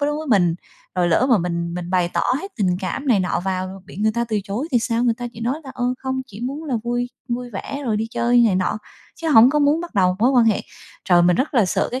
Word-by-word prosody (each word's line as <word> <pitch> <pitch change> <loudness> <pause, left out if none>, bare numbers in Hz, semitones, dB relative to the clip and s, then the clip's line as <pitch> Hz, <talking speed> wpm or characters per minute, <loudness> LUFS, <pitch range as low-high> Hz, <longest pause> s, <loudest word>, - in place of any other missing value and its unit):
với 285 - +1
đối 295 - -1
với 310 +1 -5
mình, 175 -6 +3 0.4
rồi 180 -1 +1
lỡ 205 +9 +3
mà 235 - +5
mình 170 -1 -3
mình 175 0 -5
bày 180 -2 +2
tỏ - - 0 0.2
hết 390 0 -8
tình 185 -4 +1
cảm 235 +9 -4
này 220 -6 +4
nọ 180 -1 -1
vào, 185 0 -3
bị 185 - -12
người 215 +1 +1
ta 235 0 0
từ 220 -2 -1
chối 225 +11 -4
thì 245 - +5
sao, 230 0 0
người 235 -2 +2
ta 245 +1 -6
chỉ 230 - -11
nói 255 +7 -2
là, 265 - -8
ơ, 245 - -2
không, 260 0 -3
chỉ 215 -3 -11
muốn 275 +6 -4
là 280 -5 -2
vui 245 +1 -2 0.2
vui 245 +1 -3
vẻ 275 +7 -6
rồi 220 -3 0
đi 220 +1 -1
chơi 240 +1 +2
này 200 - +2
nọ, 185 +3 -1 0.4
chứ 330 -1 -3
hổng 245 -3 +7
có 300 - +1
muốn 295 +2 +3
bắt 345 -5 -8
đầu 185 -2 +2
mối 240 +4 +3
quan 250 -3 +4
hệ. 220 -2 +2 0.4
Trời, 175 -2 +4
mình 175 0 +4
rất 280 +3 -1
là 235 -5 +5
sợ - - 0
cái 255 - -3
230 Hz, 285 wpm, -21 LUFS, 185-260 Hz, 0.4 s, hổng